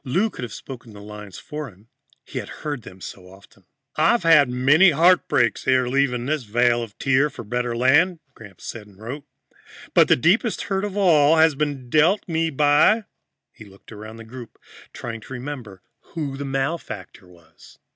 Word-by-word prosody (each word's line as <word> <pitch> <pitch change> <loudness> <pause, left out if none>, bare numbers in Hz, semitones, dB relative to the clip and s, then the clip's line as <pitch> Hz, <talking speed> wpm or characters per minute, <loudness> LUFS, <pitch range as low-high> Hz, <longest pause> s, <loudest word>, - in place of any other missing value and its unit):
Lou 190 - 0
could - - -9
have 120 -3 -6
spoken 120 -4 -10
his 100 - -11
lines 105 -2 -10
for 150 -2 -7
him, 100 +2 -21 0.4
he - - -5
had - - -8
heard 145 -4 -5
them 95 -3 -13
so 90 0 -10
often. 95 -1 -20 0.3
"I 160 +7 +4
have 235 - 0
had 150 -5 +6
many 140 +9 +5
heartbreaks 160 - +2
ere 130 -1 +3
leaving 125 -2 0
this 150 +1 -1
vale 120 +1 +1
of 110 -4 -9
tears 140 +1 +1
for - - -8
a - - -17
better 120 +2 -2
land," 150 +9 +3 0.2
Gramps 100 -7 -14
said 110 -3 -7
and 100 -2 -20
wrote. 130 +6 -7 0.7
"But - - +5
the - - +5
deepest 200 - +1
hurt 195 +1 -2
of 205 -1 -5
all 160 -6 +5
has 160 0 +5
been 140 -3 -3
dealt 160 - +2
me 165 -1 0
by 150 +9 +3 0.3
" - - -60
He 110 - -14
looked 100 +2 -18
around 110 +1 -10
the 115 - -10
group, 120 0 -11 0.3
trying 115 -2 -7
to 130 - -11
remember 125 -7 -8 0.3
who 145 -4 -3
the 140 +1 -5
malefactor 135 - -4
was. 85 -2 -19
130 Hz, 190 wpm, -22 LUFS, 115-155 Hz, 0.7 s, had